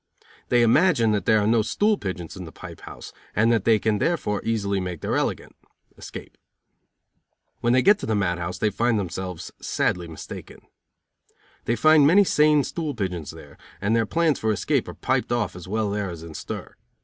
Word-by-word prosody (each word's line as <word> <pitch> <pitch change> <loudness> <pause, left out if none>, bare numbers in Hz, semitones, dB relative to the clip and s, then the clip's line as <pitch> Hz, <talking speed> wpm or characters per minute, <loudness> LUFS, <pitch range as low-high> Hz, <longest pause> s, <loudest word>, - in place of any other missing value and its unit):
They 120 -1 +4
imagine 120 -2 +4
that 105 -1 -1
there 110 - +5
are 105 - +1
no 115 +1 +3
stool 210 - +1
pigeons 90 - -6
in 95 -2 -7
the 80 - -10
pipe - - -11
house, - - -10 0.2
and 115 +2 +3
that 115 -3 +1
they 115 -1 +5
can 105 0 0
therefore 105 -11 0
easily 100 -3 0
make 90 -3 -5
their - - -1
elegant - - -2 0.4
(escape). - - -10 1.2
When 120 0 +2
they 130 - +4
get 205 +1 +5
to - - -5
the 110 - +1
mad 90 -4 0
house 90 +1 -4
they 105 +3 +1
find 115 +2 +1
themselves 90 -2 -5
sadly 90 -1 -1
mistaken. 80 -1 -9 1.0
They 120 - +1
find 155 +1 +5
many 195 +6 +6
sane 150 -5 +4
stool 155 -3 -4
pigeons 90 -7 -3
there, - - -12 0.2
and 105 +3 +1
their 115 -2 +1
plans 165 0 +1
for 110 - +1
escape 100 -4 0
are - - -8
piped - - -1
off 110 -7 -1
as 90 -1 -10
well 105 +1 -1
there 100 -2 -2
as 85 -2 -8
in 85 -1 -9
stir. - - -7
110 Hz, 195 wpm, -24 LUFS, 95-120 Hz, 1.2 s, many